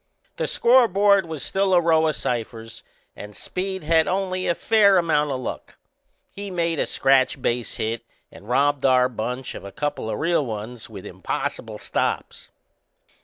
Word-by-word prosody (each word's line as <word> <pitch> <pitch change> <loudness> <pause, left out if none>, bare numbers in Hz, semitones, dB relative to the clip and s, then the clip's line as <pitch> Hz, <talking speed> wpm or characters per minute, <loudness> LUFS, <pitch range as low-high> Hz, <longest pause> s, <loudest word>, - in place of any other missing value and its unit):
The - - -1
scoreboard 205 -6 +4
was 160 -3 -5
still 195 -1 +1
a - - +6
row 160 -2 +3
o' - - +2
ciphers 115 -4 -4 0.3
and 105 0 -10
Speed'd 190 0 -4
had 160 +1 +3
only 185 -1 -1
a 170 - +2
fair 205 -3 +4
amount 155 -4 +2
o' 135 - -1
luck. 130 - -7 0.5
He'd 200 0 -7
made 170 -2 0
a - - 0
scratch 135 0 +2
base 120 -1 -2
hit 115 +1 -2 0.3
and 105 - -14
robbed 140 +2 +2
our 130 -1 +4
bunch 125 +2 -4
of - - -9
a 100 - -8
couple 145 -5 -3
o' - - -2
real 165 +7 +1
ones 115 +1 -6
with 100 -4 -10
impossible - - -4
stops. - - -3
150 Hz, 165 wpm, -23 LUFS, 125-185 Hz, 0.5 s, a